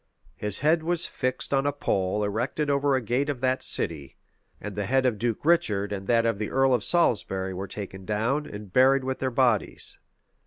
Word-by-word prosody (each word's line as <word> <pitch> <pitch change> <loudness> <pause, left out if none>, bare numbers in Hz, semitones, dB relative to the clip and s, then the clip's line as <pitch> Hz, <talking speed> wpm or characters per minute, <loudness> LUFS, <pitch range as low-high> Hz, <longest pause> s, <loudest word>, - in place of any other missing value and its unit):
His 105 - -1
head 160 +3 +3
was 170 +1 0
fixed 130 +1 -3
on 135 +1 +2
a - - +2
pole 100 -7 -1
erected 120 +8 -1
over 140 0 +2
a 130 - 0
gate 125 +6 0
of 140 -4 -2
that 130 0 +1
city; 75 -6 -1 0.4
and 105 -2 -7
the 100 -1 -2
head 135 0 +2
of 115 -5 +1
Duke 120 +2 -2
Richard 105 -12 +2
and 95 -1 -6
that 115 -1 +3
of 115 -3 0
the 105 - -2
earl 135 0 +3
of 120 -4 +1
Salisbury 95 - +1
were 95 +2 -5
taken 95 -2 -7
down, 115 +9 -1
and 105 -2 -9
buried 135 +1 +5
with 130 0 -3
their 130 - 0
bodies. 120 -4 0
120 Hz, 200 wpm, -26 LUFS, 100-135 Hz, 0.4 s, buried